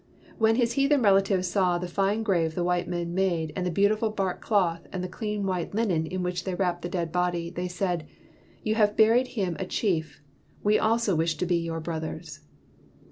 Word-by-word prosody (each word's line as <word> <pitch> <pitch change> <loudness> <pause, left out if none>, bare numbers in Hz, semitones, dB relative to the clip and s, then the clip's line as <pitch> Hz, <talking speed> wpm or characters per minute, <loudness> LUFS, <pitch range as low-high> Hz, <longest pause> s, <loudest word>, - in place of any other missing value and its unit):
When 225 0 +4
his 235 -1 +1
heathen 275 0 +3
relatives 195 -2 +3
saw 180 -1 +2
the 180 +1 -4
fine 200 +5 0
grave 170 -6 +1
the 175 - 0
white 180 0 0
men 175 -1 -3
made 175 -4 0
and 180 -1 -1
the - - +1
beautiful 210 +5 +2
bark 195 -3 -2
cloth 175 -6 +1
and 185 -1 -4
the - - -2
clean 210 +1 -3
white 185 0 -2
linen 180 -8 +1
in 185 +2 -3
which 180 -1 -2
they 190 -2 -3
wrapped 180 -2 -1
the 175 - -4
dead 170 -3 -2
body, 175 -1 -1
they 180 0 -3
said: 180 -3 -2 0.6
"You 215 - +1
have 210 -2 +2
buried 230 +4 +5
him 185 -5 0
a 190 - -2
chief; 165 -8 -1 0.4
we 210 +1 +4
also 225 -2 +2
wish 160 0 +1
to 180 - -1
be 175 -1 +2
your 165 -1 -3
brothers." 160 -1 -5
180 Hz, 200 wpm, -27 LUFS, 170-205 Hz, 0.6 s, buried